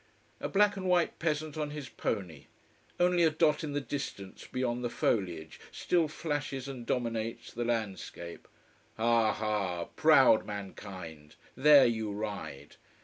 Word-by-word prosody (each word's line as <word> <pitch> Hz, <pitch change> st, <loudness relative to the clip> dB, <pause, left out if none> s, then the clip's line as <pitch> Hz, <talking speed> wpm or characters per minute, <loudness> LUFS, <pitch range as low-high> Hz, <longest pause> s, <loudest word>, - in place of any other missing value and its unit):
A -, -, -3 dB
black 205 Hz, 0 st, +4 dB
and 185 Hz, -1 st, -3 dB
white 175 Hz, -2 st, +2 dB
peasant 155 Hz, -2 st, -1 dB
on 150 Hz, -1 st, -2 dB
his 145 Hz, -2 st, -6 dB
pony, 100 Hz, -8 st, -4 dB, 0.5 s
only 180 Hz, 0 st, +3 dB
a 165 Hz, -, +6 dB
dot 155 Hz, 0 st, +2 dB
in 150 Hz, -2 st, -3 dB
the 145 Hz, -, 0 dB
distance 135 Hz, -9 st, -6 dB
beyond 125 Hz, -1 st, -2 dB
the 120 Hz, -, 0 dB
foliage, 85 Hz, -10 st, -1 dB
still 170 Hz, -3 st, +1 dB
flashes 145 Hz, -4 st, -3 dB
and 125 Hz, -4 st, -7 dB
dominates 115 Hz, -1 st, -2 dB
the 120 Hz, -, -2 dB
landscape. 100 Hz, -7 st, -4 dB, 0.5 s
Ha 115 Hz, -1 st, +3 dB
ha! 100 Hz, -6 st, -1 dB
proud 135 Hz, -7 st, +6 dB
mankind! 95 Hz, -7 st, -8 dB, 0.2 s
There 145 Hz, +1 st, +7 dB
you 110 Hz, -3 st, 0 dB
ride! 100 Hz, -9 st, -6 dB
120 Hz, 140 wpm, -31 LUFS, 100-150 Hz, 0.5 s, There